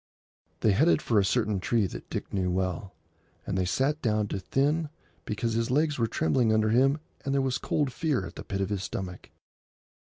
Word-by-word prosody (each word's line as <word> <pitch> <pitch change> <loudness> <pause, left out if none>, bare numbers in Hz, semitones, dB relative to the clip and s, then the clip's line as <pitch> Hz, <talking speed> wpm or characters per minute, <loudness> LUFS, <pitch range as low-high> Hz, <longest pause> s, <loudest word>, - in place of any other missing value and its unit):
They 110 - +4
headed 150 - +4
for 115 -7 +2
a - - +3
certain 105 -1 +1
tree 110 +2 +1
that 90 - -7
Dick - - -5
knew 95 -2 0
well, 95 +1 -2 0.5
and - - -2
they 95 -1 +1
sat 140 - 0
down 110 -4 +1
to 95 - -2
think, 145 - +1 0.4
because 110 +2 -2
his 115 +2 0
legs 150 +1 +1
were 115 - +2
trembling 110 +3 +2
under 110 0 +3
him 135 +6 +3 0.2
and 140 -1 -1
there - - +3
was 135 -1 0
cold 145 -4 0
fear 155 -7 0
at - - -8
the - - -8
pit 100 -1 -3
of 95 - -1
his 100 -3 -2
stomach. 90 -1 -6
110 Hz, 200 wpm, -28 LUFS, 95-135 Hz, 0.5 s, They